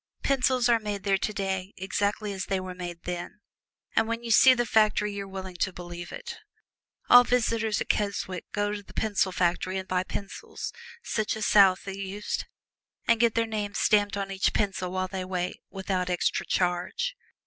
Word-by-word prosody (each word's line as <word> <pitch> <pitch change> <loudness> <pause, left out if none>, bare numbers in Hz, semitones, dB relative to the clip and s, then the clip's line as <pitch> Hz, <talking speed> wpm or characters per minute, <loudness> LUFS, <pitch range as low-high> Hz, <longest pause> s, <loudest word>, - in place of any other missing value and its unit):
Pencils 255 -2 +2
are 235 -1 +4
made 205 -3 -4
there 195 -1 +2
today 195 -2 -2
exactly 200 +2 -1
as 190 -1 -3
they 195 -1 0
were 185 0 -6
made 175 -1 -7
then, 175 +4 -5 0.6
and 225 - +3
when 230 +1 -3
you 230 - -3
see 255 +4 +8
the 240 -1 +1
factory 215 -2 +3
you 200 -1 -4
are - - -11
willing 190 -2 -7
to 190 - 0
believe 175 -1 -8
it. - - -7 0.7
All 245 0 +9
visitors 230 -3 +1
at - - -4
Keswick 200 -3 -1
go 205 0 0
to 210 0 -4
the 200 - -17
pencil 205 -3 +1
factory 185 +1 0
and 190 0 -5
buy 185 0 +1
pencils, 200 +1 -6 0.3
such 215 -1 -1
as 215 - -2
Southey 195 -1 +4
used, 200 +2 -3 0.6
and 230 -1 +4
get 235 -1 +3
their 230 0 +2
names 210 -2 -3
stamped 205 -1 +3
on 195 -1 -3
each 190 -1 +1
pencil 195 -3 -1
while 185 0 -1
they 185 0 -4
wait, 185 -1 -3
without 190 -2 -2
extra 180 -1 0
charge. 185 - 0
200 Hz, 180 wpm, -27 LUFS, 185-215 Hz, 0.7 s, All